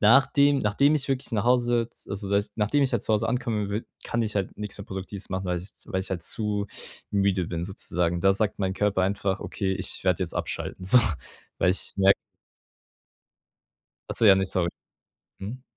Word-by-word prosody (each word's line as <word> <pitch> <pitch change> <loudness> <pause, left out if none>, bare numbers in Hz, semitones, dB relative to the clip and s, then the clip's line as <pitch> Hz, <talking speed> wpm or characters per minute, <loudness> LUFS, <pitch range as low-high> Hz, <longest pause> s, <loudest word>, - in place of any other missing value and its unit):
nachdem 140 +5 +5
nachdem 135 +7 +3
ich 145 -2 -1
wirklich 135 -1 -1
nach 105 -1 0
Hause 120 -1 +3
jetzt 115 - -13
also 100 0 -4
da 100 - +2
ist 100 +1 -1
nachdem 110 +7 +2
ich 135 - +2
halt 120 - +1
zu 110 - +1
Hause 105 - +1
ankomme 115 -4 -1
wi 105 +3 -2 0.2
kann 120 - -1
ich 110 -1 -2
halt 100 -2 -2
nix 105 -1 -5
mehr 100 - -8
Produktives 95 +1 -7
machen, 95 0 -2
weil 90 -1 -1
ich 95 +3 -10 0.2
weil 95 - -1
ich 95 - -6
halt 90 -3 -2
zu 105 +1 -2 0.4
müde 100 -3 +1
bin 85 0 -3
sozusagen. 85 -2 -1
Da 95 +1 +5
sagt 105 +1 0
mein 95 -1 -1
Körper 100 -2 +1
einfach: 100 0 0
„Okay, 95 -1 -2
ich 95 0 -3
werde 90 -2 +2
jetzt 85 - -3
abschalten 95 - -4
so.“ 125 +7 +8 0.6
Weil 90 - +4
ich 95 - -1
merke 95 0 +6 2.0
Ach - - -3
so, 115 - +1
ja, 100 - +9
ne, 95 - +1
sorry. 90 -2 0 0.7
Mhm. 115 +7 -7
100 Hz, 200 wpm, -26 LUFS, 95-115 Hz, 2.0 s, ja